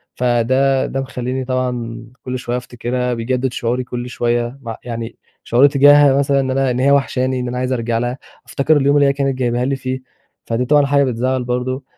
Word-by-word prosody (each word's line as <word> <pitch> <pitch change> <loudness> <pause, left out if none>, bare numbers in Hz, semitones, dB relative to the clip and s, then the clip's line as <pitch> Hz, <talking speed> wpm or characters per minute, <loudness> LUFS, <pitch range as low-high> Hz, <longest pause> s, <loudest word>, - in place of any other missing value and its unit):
فده 130 +2 +2
ده 135 - -3
مخلّيني 130 0 -4
طبعًا 125 -3 -3 0.2
كل 130 0 -4
شوية 120 0 -3
أفتكرها، 125 0 -3
بيجدد 125 +2 -2
شعوري 125 +2 -1
كل 125 0 -6
شوية. 120 +2 -1
م 115 -2 -5
يعني 115 -2 -6 0.3
شعور 125 +4 +4
تجاهها 145 0 +6
مثلًا 140 0 +2
إن 130 -1 -1
أنا 135 0 +1
إن 125 - -2
هي 135 +2 +3
واحشاني، 130 -2 +1
إن 125 - -3
أنا 125 +1 -4
عايز 130 +1 -1
أرجع 115 -1 -1
لها. 120 +2 -2 0.3
أفتكر 150 +2 +2
اليوم 140 0 +2
اللي 145 -1 +4
هي 140 - +2
كانت 135 -2 -1
جايباها 120 -1 0
لي 135 +1 0
فيه، 130 0 -4 0.5
فدي 115 +2 -1
طبعًا 145 +2 +4
حاجة 140 0 +3
بتزعّل 130 0 -1
برضه. 125 +2 -2
130 Hz, 195 wpm, -18 LUFS, 120-135 Hz, 0.5 s, تجاهها